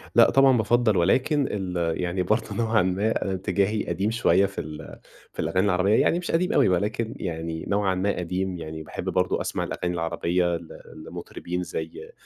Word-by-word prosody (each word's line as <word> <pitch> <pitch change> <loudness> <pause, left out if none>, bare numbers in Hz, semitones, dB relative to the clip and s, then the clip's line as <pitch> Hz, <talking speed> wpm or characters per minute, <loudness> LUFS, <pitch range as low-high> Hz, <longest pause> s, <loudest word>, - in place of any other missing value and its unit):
لأ - - +7
طبعًا 135 -2 +5
بافضل 115 -2 +2
ولكن 135 - +2
ال 90 -4 -2
يعني 90 +1 -1
برضو 110 +5 -1
نوعًا 115 -1 +2
ما 95 +2 0
اتجاهي 100 +3 0
قديم 95 +5 -1
شويّة 115 -4 +3
في 100 0 -4
ال 75 -1 -9 0.3
في - - -15
الأغاني 95 +2 +1
العربيّة 95 +2 +3
يعني 170 - +2
مش 180 - -4
قديم 180 +2 +1
أوي 90 -2 +3 0.3
يعني 80 -2 -4
نوعًا 100 -2 +1
ما 100 +2 0
قديم. 90 +1 -2
يعني 80 -1 -7
باحب 75 - -7
برضو - - 0
أسمع - - -2
الأغاني 90 0 -3
العربيّة 85 +1 0
ل 85 -1 -13 0.4
لمطربين 90 +1 -5
زي 80 -2 -6
95 Hz, 165 wpm, -25 LUFS, 85-110 Hz, 0.4 s, لأ